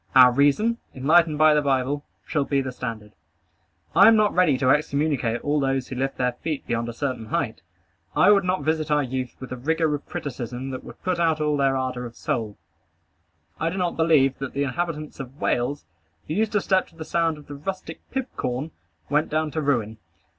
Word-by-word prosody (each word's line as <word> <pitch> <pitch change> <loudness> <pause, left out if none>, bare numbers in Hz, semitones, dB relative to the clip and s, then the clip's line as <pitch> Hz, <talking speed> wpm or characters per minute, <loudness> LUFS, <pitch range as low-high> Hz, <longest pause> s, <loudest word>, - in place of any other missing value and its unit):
Our 125 -1 +9
reason, 145 - +2 0.2
enlightened 155 +3 +4
by 155 0 +6
the 150 - +3
Bible, 140 +1 0 0.2
shall 145 - 0
be 140 0 0
the 130 -1 -2
standard. 115 -4 -6 0.8
I - - +8
am 225 - +7
not 215 -1 +3
ready 170 -7 +3
to 130 -1 +3
excommunicate 140 -6 +1
all 150 +1 +1
those 135 -1 -1
who 130 - -5
lift 135 +2 -2
their 125 -1 +1
feet 150 +4 -5
beyond 115 0 -2
a - - -5
certain 125 -3 -3
height. - - -2 0.5
I - - +6
would 200 -2 +5
not 180 -3 0
visit 155 0 0
our 150 -1 +3
youth 130 -1 -4
with 130 - -9
a - - -2
rigor 160 +4 +1
of 145 - -5
criticism 125 -1 -5
that 130 - -6
would - - -13
put 185 -2 0
out 160 -2 +2
all 150 -1 +1
their 135 -1 +2
ardor 125 -1 -3
of 115 - -14
soul. 110 -3 -3 1.0
I 165 - +1
do 185 - -5
not 180 -2 0
believe 155 -5 +3
that 135 - -2
all - - -16
the 140 - 0
inhabitants 155 +2 -3
of 135 +1 -8
Wales, 130 +4 -1 0.4
who 155 - -3
used 215 +3 0
to 205 - +2
step 190 -1 +2
to 165 - -22
the 160 -1 -7
sound 165 -2 0
of 150 - -13
the 145 - -9
rustic 160 +3 -6
pibcorn, 155 - -3 0.4
went 150 +2 +1
down 155 0 0
to 160 - -2
ruin. 115 -7 0
145 Hz, 210 wpm, -24 LUFS, 130-160 Hz, 1.0 s, Our